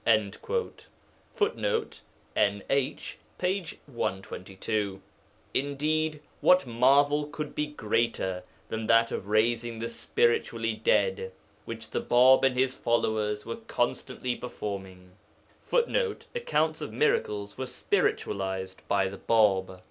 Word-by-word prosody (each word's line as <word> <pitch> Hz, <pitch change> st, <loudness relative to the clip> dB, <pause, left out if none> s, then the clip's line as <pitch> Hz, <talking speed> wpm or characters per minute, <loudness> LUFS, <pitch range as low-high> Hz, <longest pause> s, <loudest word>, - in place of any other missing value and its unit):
[Footnote: 450 Hz, +1 st, -1 dB, 0.3 s
NH, 105 Hz, +7 st, 0 dB, 0.2 s
p. 185 Hz, 0 st, 0 dB, 0.2 s
122.] 95 Hz, -3 st, -3 dB, 0.5 s
Indeed, 150 Hz, +2 st, 0 dB, 0.2 s
what 180 Hz, -4 st, +5 dB
marvel 140 Hz, +5 st, +3 dB
could 150 Hz, 0 st, -5 dB
be 150 Hz, -, -1 dB
greater 115 Hz, -8 st, -1 dB, 0.3 s
than 110 Hz, 0 st, -3 dB
that 115 Hz, 0 st, +5 dB
of 100 Hz, -, -4 dB
raising 115 Hz, +2 st, +1 dB
the 115 Hz, +1 st, -3 dB
spiritually 455 Hz, -, +1 dB
dead, 475 Hz, -1 st, +1 dB, 0.3 s
which -, -, -7 dB
the -, -, -1 dB
Bāb 130 Hz, +2 st, +6 dB
and 130 Hz, -1 st, +3 dB
his 130 Hz, 0 st, +2 dB
followers 110 Hz, -4 st, 0 dB
were 115 Hz, -, -4 dB
constantly 125 Hz, -1 st, -2 dB
performing? 95 Hz, -6 st, -6 dB, 0.5 s
[Footnote: 485 Hz, -1 st, 0 dB
Accounts 160 Hz, -, 0 dB
of 150 Hz, -, -5 dB
miracles 105 Hz, -5 st, 0 dB
were 130 Hz, -, -2 dB
spiritualized 95 Hz, -5 st, -1 dB
by 100 Hz, -1 st, +2 dB
the 95 Hz, +1 st, -7 dB
Bāb. 95 Hz, -5 st, +2 dB
120 Hz, 105 wpm, -28 LUFS, 105-150 Hz, 0.5 s, Bāb